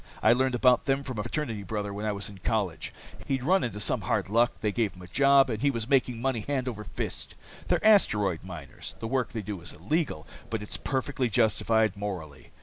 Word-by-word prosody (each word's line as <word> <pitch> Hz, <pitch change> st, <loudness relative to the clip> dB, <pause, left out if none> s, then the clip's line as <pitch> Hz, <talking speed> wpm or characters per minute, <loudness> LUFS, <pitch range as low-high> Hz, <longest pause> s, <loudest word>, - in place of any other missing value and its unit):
I 110 Hz, -, +7 dB
learned 130 Hz, +1 st, +1 dB
about 125 Hz, 0 st, +4 dB
them 135 Hz, 0 st, +1 dB
from 130 Hz, -5 st, -5 dB
a -, -, +1 dB
fraternity 115 Hz, -2 st, -3 dB
brother 105 Hz, 0 st, -3 dB
while 105 Hz, +2 st, -3 dB
I -, -, +1 dB
was 100 Hz, 0 st, -1 dB
in 100 Hz, -2 st, -9 dB
college. 100 Hz, -4 st, -1 dB, 0.4 s
He'd 135 Hz, -2 st, -1 dB
run 185 Hz, +7 st, +3 dB
into 105 Hz, -3 st, -3 dB
some -, -, 0 dB
hard -, -, -1 dB
luck, 120 Hz, +3 st, +3 dB
they 105 Hz, -, +1 dB
gave 110 Hz, -1 st, 0 dB
him 90 Hz, -, -13 dB
a -, -, -10 dB
job, 140 Hz, +5 st, +5 dB
and 110 Hz, -1 st, -3 dB
he 140 Hz, -, +3 dB
was 115 Hz, -4 st, -2 dB
making 130 Hz, -3 st, +2 dB
money 130 Hz, -1 st, 0 dB
hand 130 Hz, +3 st, -2 dB
over 110 Hz, -4 st, -4 dB
fist. 95 Hz, -, -5 dB, 0.3 s
They're -, -, +1 dB
asteroid 105 Hz, -, +4 dB
miners. 80 Hz, -8 st, -8 dB
The 110 Hz, -, -4 dB
work 130 Hz, +1 st, 0 dB
they 110 Hz, -2 st, -4 dB
do 100 Hz, -3 st, -5 dB
is 85 Hz, -, -6 dB
illegal, 155 Hz, -, -2 dB, 0.2 s
but 110 Hz, -2 st, -3 dB
it's 105 Hz, -, -5 dB
perfectly 130 Hz, -2 st, -1 dB
justified 110 Hz, -1 st, +2 dB
morally. 90 Hz, -9 st, -6 dB
110 Hz, 220 wpm, -28 LUFS, 100-130 Hz, 0.4 s, I